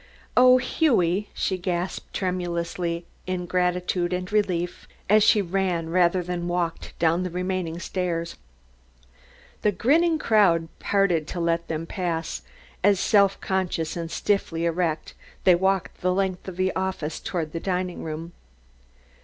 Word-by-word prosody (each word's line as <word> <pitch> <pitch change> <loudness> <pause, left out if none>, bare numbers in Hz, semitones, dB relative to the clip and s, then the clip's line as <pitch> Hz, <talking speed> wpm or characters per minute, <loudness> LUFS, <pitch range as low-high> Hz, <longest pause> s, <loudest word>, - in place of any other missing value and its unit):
"Oh, 255 0 +7
Hughie!" 210 - +1
she 190 -1 -2
gasped 175 0 -3
tremulously 175 -2 -2 0.2
in 180 -1 -2
gratitude 180 0 0
and 180 +1 -3
relief 180 -5 -1 0.2
as 215 +2 +5
she 210 -1 +5
ran 175 -3 -1
rather 180 0 +3
than 175 0 -3
walked 175 -1 -2
down 165 +1 +2
the 185 - -2
remaining 180 -1 -2
stairs. 170 -2 -3 1.3
The 210 - +3
grinning 315 - +3
crowd 190 - +3
parted 180 -6 +1
to 180 - -5
let 170 0 0
them 160 0 -3
pass 165 -3 -3 0.4
as, 200 -1 +4
self 200 -2 +3
conscious 180 -4 -1
and 170 -1 -4
stiffly 170 -2 0
erect, 165 -2 -1 0.3
they 185 - +7
walked 190 +1 0
the 185 - +2
length 190 -1 -1
of 185 -2 -6
the 185 0 0
office 190 -5 -2
towards 160 -4 -3
the 165 - -3
dining 180 0 -2
room. 160 +2 -5
180 Hz, 135 wpm, -25 LUFS, 170-190 Hz, 1.3 s, Oh